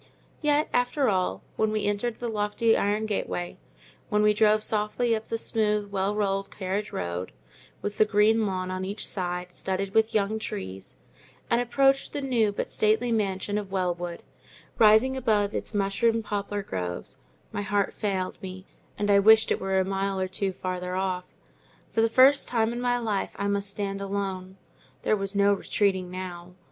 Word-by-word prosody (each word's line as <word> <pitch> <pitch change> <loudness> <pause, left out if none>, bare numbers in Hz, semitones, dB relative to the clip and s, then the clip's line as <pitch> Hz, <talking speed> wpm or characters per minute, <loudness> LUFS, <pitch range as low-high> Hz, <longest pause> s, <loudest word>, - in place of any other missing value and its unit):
Yet, 300 0 +2
after 245 +2 +2
all, 180 - 0
when 220 0 +1
we 215 -1 -1
entered 205 +3 -1
the 240 - -5
lofty 220 +1 +1
iron 210 +2 +1
gateway, 185 -4 -3 0.5
when 210 0 +2
we 210 0 +5
drove 215 0 +4
softly 220 +3 +1
up 220 0 -6
the 230 - -2
smooth, 210 -2 0
well 195 +1 0
rolled 195 -1 0
carriage 200 +2 -3
road, 90 +1 -4 0.5
with 205 0 -4
the 215 - +7
green 215 +1 +3
lawn 185 -1 -3
on 185 0 -3
each 200 +3 -4
side, 180 -1 -3
studded 190 +2 -3
with 220 0 +2
young 215 +1 +1
trees, 95 - -6 0.6
and 235 +1 +4
approached 270 +3 +2
the 290 - -2
new 240 -6 +2
but 200 - -4
stately 220 +3 +2
mansion 205 -1 0
of 200 -2 -8
Wellwood, 175 -2 -2 0.6
rising 220 +4 +6
above 215 -5 +1
its - - -3
mushroom 220 +3 +1
poplar 205 -1 -3
groves, 90 - -5 0.3
my - - -3
heart 205 -1 0
failed 190 -3 -2
me, 185 -1 -8 0.3
and 205 0 +1
I 200 - +6
wished 220 +2 +6
it - - 0
were 190 0 0
a 190 - +2
mile 195 0 -1
or 185 - 0
two 190 +1 -2
farther 180 0 -4
off. 185 -1 -3 0.6
For 225 - +1
the 225 - +3
first 265 +4 +5
time 230 -1 +1
in 240 - -4
my 245 0 +1
life 215 -5 -2
I 200 - -1
must 200 0 0
stand 195 0 -3
alone: 195 -1 -4 0.5
there - - +3
was 195 0 -4
no 200 0 +4
retreating 190 -2 0
now. 180 -1 -7
205 Hz, 175 wpm, -27 LUFS, 190-220 Hz, 0.6 s, the